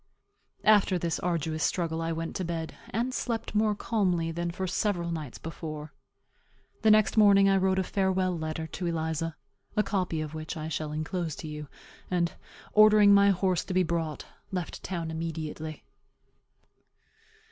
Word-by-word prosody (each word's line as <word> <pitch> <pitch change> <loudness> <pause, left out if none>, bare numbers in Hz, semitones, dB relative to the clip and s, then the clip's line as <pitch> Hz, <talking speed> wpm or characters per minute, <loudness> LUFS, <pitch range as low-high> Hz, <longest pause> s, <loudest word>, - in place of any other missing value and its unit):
After 205 -3 +5
this 170 -1 -1
arduous 160 -2 -1
struggle 165 -2 0
I 165 0 -1
went 165 0 -4
to 185 - -2
bed, 165 -2 -3 0.2
and 240 +5 -1
slept 230 -4 -2
more 210 0 +2
calmly 180 -7 0
than 170 +1 -2
for 185 +2 -3
several 180 -2 -1
nights 155 -6 -5
before. 155 -2 -7 0.9
The 220 - +4
next 215 +1 +4
morning 200 -2 +7
I 195 0 +4
wrote 190 0 +2
a 190 - +2
farewell 190 -1 +1
letter 160 0 -3
to 175 +3 -4
Eliza, 160 -1 -2 0.4
(a 210 - +4
copy 185 -6 -1
of 155 -1 -4
which 155 +2 -5
I 155 0 -4
shall 155 -1 -3
enclose 160 +1 -3
to - - -7
you,) 150 -1 -6 0.4
and, 175 -2 +1 0.4
ordering 215 -1 +7
my 200 0 +6
horse 185 -2 +1
to 185 - -4
be 185 - +4
brought, 165 -3 -2 0.3
left 180 -3 -4
town 170 -3 -4
immediately. 160 -1 -5
170 Hz, 160 wpm, -28 LUFS, 160-195 Hz, 0.9 s, morning